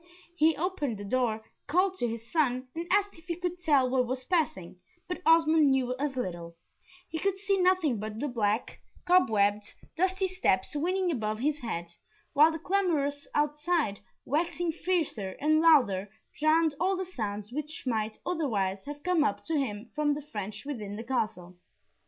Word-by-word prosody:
He 320 Hz, -1 st, +3 dB
opened 305 Hz, -, -2 dB
the 205 Hz, -, -7 dB
door, 220 Hz, -1 st, 0 dB, 0.2 s
called 365 Hz, +5 st, +2 dB
to 240 Hz, -, +1 dB
his 230 Hz, 0 st, -5 dB
son, 255 Hz, -5 st, +1 dB
and 335 Hz, +1 st, -5 dB
asked 405 Hz, +1 st, +2 dB
if 330 Hz, -, -20 dB
he 345 Hz, -2 st, -3 dB
could 355 Hz, 0 st, -4 dB
tell 290 Hz, -7 st, +3 dB
what 250 Hz, -1 st, +1 dB
was 255 Hz, +1 st, -3 dB
passing, 290 Hz, -, -1 dB, 0.3 s
but 360 Hz, 0 st, -4 dB
Osmond 320 Hz, -2 st, +5 dB
knew 255 Hz, -2 st, +1 dB
as 285 Hz, -2 st, -1 dB
little 170 Hz, -7 st, -4 dB, 0.5 s
he 320 Hz, -, -4 dB
could 390 Hz, +1 st, 0 dB
see 395 Hz, 0 st, 0 dB
nothing 360 Hz, -, +3 dB
but 215 Hz, +1 st, -5 dB
the 290 Hz, -, -1 dB
black, 220 Hz, -3 st, -1 dB, 0.3 s
cobwebbed, 210 Hz, -, +3 dB, 0.2 s
dusty 375 Hz, +2 st, +1 dB
steps 305 Hz, -, 0 dB
winding 360 Hz, +4 st, +1 dB
above 215 Hz, -6 st, -2 dB
his 295 Hz, +5 st, 0 dB
head, 175 Hz, -9 st, -4 dB, 0.5 s
while 305 Hz, +3 st, +6 dB
the 320 Hz, -, -4 dB
clamours 320 Hz, -6 st, 0 dB
outside, 295 Hz, -, +1 dB, 0.3 s
waxing 340 Hz, +3 st, 0 dB
fiercer 315 Hz, -, -2 dB
and 310 Hz, +2 st, +3 dB
louder, 225 Hz, -, +4 dB, 0.3 s
drowned 315 Hz, 0 st, +3 dB
all 375 Hz, +2 st, +1 dB
the 375 Hz, -, -2 dB
sounds 210 Hz, -, -5 dB
which 300 Hz, +3 st, -5 dB
might 220 Hz, -3 st, -1 dB
otherwise 210 Hz, -, -1 dB
have 290 Hz, 0 st, -8 dB
come 360 Hz, -4 st, +3 dB
up 205 Hz, -, -1 dB
to 325 Hz, -, -2 dB
him 225 Hz, -3 st, -4 dB
from 295 Hz, -1 st, +1 dB
the 300 Hz, -, -5 dB
French 210 Hz, +2 st, -5 dB
within 215 Hz, -8 st, -5 dB
the 225 Hz, -, -6 dB
Castle. 195 Hz, -8 st, -3 dB
290 Hz, 170 wpm, -29 LUFS, 220-340 Hz, 0.5 s, while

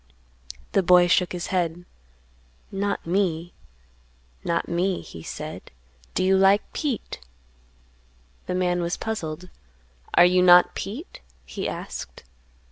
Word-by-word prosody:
The 195 Hz, -, +3 dB
boy 180 Hz, -1 st, +6 dB
shook 175 Hz, +1 st, +2 dB
his 180 Hz, -1 st, -4 dB
head; 175 Hz, -1 st, -1 dB, 0.9 s
"Not 200 Hz, +1 st, -2 dB
me; 175 Hz, -2 st, -1 dB, 0.9 s
not 170 Hz, 0 st, -1 dB
me;" 180 Hz, +2 st, 0 dB
he 80 Hz, -, -11 dB
said; -, -, -7 dB, 0.5 s
"do -, -, +1 dB
you 190 Hz, +1 st, +4 dB
like 195 Hz, +2 st, +3 dB
Pete?" 280 Hz, -8 st, -3 dB, 1.3 s
The 180 Hz, -, -2 dB
man 180 Hz, -1 st, +1 dB
was 170 Hz, 0 st, -2 dB
puzzled. 180 Hz, -5 st, -5 dB, 0.7 s
"Are 175 Hz, -, +8 dB
you 180 Hz, +1 st, +4 dB
not 180 Hz, 0 st, +7 dB
Pete?" 245 Hz, -, -7 dB, 0.2 s
he 65 Hz, -, -4 dB
asked. -, -, -7 dB
180 Hz, 120 wpm, -24 LUFS, 175-195 Hz, 1.3 s, Are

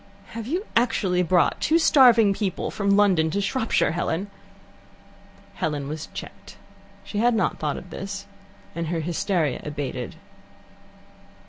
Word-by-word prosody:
"Have 230 Hz, -1 st, -7 dB
you 355 Hz, -, -2 dB
actually 205 Hz, -6 st, +2 dB
brought 180 Hz, 0 st, +2 dB
two 320 Hz, -, +3 dB
starving 240 Hz, -10 st, +6 dB
people 195 Hz, -2 st, -3 dB
from 200 Hz, -1 st, -2 dB
London 185 Hz, -6 st, +3 dB
to 200 Hz, -, -1 dB
Shropshire, 225 Hz, +4 st, +1 dB
Helen?" 175 Hz, +4 st, -2 dB, 1.2 s
Helen 150 Hz, -7 st, -3 dB
was 155 Hz, +1 st, -5 dB
checked. -, -, -10 dB, 0.5 s
She 205 Hz, -, -4 dB
had 240 Hz, +1 st, +3 dB
not 220 Hz, -, 0 dB
thought 150 Hz, -2 st, -2 dB
of 180 Hz, -, -10 dB
this, 195 Hz, +1 st, -6 dB, 0.5 s
and 170 Hz, -1 st, -3 dB
her 165 Hz, 0 st, -1 dB
hysteria 165 Hz, -2 st, -1 dB
abated. 140 Hz, -4 st, -5 dB
190 Hz, 130 wpm, -24 LUFS, 160-220 Hz, 1.2 s, starving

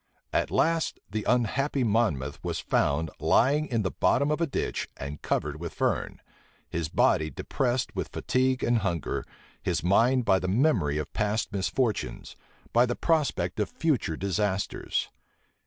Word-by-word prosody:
At -, -, +1 dB
last, 165 Hz, 0 st, +1 dB
the 110 Hz, 0 st, -3 dB
unhappy 130 Hz, +3 st, +1 dB
Monmouth 95 Hz, -, 0 dB
was -, -, -2 dB
found, 75 Hz, +2 st, +1 dB
lying 145 Hz, +6 st, +3 dB
in 115 Hz, -5 st, 0 dB
the 95 Hz, -, -1 dB
bottom 140 Hz, +2 st, +2 dB
of 150 Hz, -, 0 dB
a 170 Hz, -, +2 dB
ditch, -, -, -2 dB
and 70 Hz, +1 st, -6 dB
covered 75 Hz, +1 st, -1 dB
with 85 Hz, -, -6 dB
fern; -, -, -1 dB, 0.5 s
his 80 Hz, -2 st, -3 dB
body 80 Hz, -1 st, +3 dB
depressed 125 Hz, -, -1 dB
with -, -, -2 dB
fatigue 130 Hz, 0 st, 0 dB
and 120 Hz, -1 st, +3 dB
hunger; 85 Hz, -6 st, -2 dB, 0.4 s
his -, -, -1 dB
mind 115 Hz, +7 st, +3 dB
by 95 Hz, -, +4 dB
the 90 Hz, -, -3 dB
memory 95 Hz, -, +2 dB
of 75 Hz, -, -4 dB
past 105 Hz, 0 st, -1 dB
misfortunes, 100 Hz, -, -1 dB, 0.4 s
by 120 Hz, +2 st, +5 dB
the 120 Hz, -, -1 dB
prospect 140 Hz, -, 0 dB
of 105 Hz, -, 0 dB
future 135 Hz, -, 0 dB
disasters. 100 Hz, +1 st, -1 dB
110 Hz, 150 wpm, -27 LUFS, 85-130 Hz, 0.5 s, by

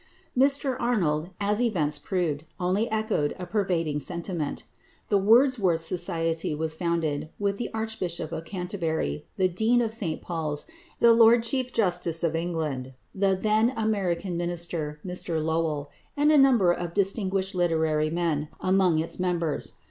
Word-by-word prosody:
Mr 275 Hz, 0 st, +3 dB
Arnold, 175 Hz, -10 st, 0 dB
as 205 Hz, +2 st, 0 dB
events 155 Hz, -11 st, +1 dB
proved, 155 Hz, -3 st, -2 dB, 0.2 s
only 185 Hz, +6 st, 0 dB
echoed 220 Hz, -9 st, 0 dB
a 180 Hz, -, -6 dB
pervading 175 Hz, -6 st, -1 dB
sentiment. 170 Hz, -2 st, -3 dB, 0.5 s
The 205 Hz, -, +3 dB
Wordsworth 215 Hz, -5 st, +4 dB
Society 165 Hz, -2 st, -1 dB
was 160 Hz, +1 st, -2 dB
founded, 160 Hz, -3 st, -1 dB
with 200 Hz, -1 st, -1 dB
the 240 Hz, -, -3 dB
Archbishop 220 Hz, -8 st, -3 dB
of 160 Hz, -, -4 dB
Canterbury, 165 Hz, -, -3 dB
the 190 Hz, -1 st, +3 dB
Dean 220 Hz, +7 st, +2 dB
of 225 Hz, -2 st, 0 dB
St 180 Hz, -8 st, -1 dB
Paul's, 155 Hz, -4 st, -3 dB, 0.3 s
the 235 Hz, -1 st, +6 dB
Lord 230 Hz, 0 st, +6 dB
Chief 255 Hz, +1 st, 0 dB
Justice 175 Hz, -7 st, 0 dB
of 165 Hz, -1 st, +1 dB
England, 155 Hz, -6 st, -3 dB, 0.2 s
the 195 Hz, -1 st, +1 dB
then 215 Hz, +4 st, +2 dB
American 195 Hz, -5 st, -1 dB
Minister 170 Hz, -3 st, -3 dB
Mr 180 Hz, -2 st, -2 dB
Lowell 155 Hz, -2 st, -1 dB, 0.3 s
and 295 Hz, +1 st, +4 dB
a -, -, +5 dB
number 245 Hz, -10 st, +5 dB
of 175 Hz, -1 st, -4 dB
distinguished 195 Hz, -1 st, +1 dB
literary 160 Hz, -3 st, +1 dB
men, 160 Hz, -3 st, -1 dB
among 185 Hz, -3 st, +3 dB
its 165 Hz, +3 st, -2 dB
members. 175 Hz, -4 st, -1 dB
175 Hz, 140 wpm, -26 LUFS, 160-210 Hz, 0.5 s, the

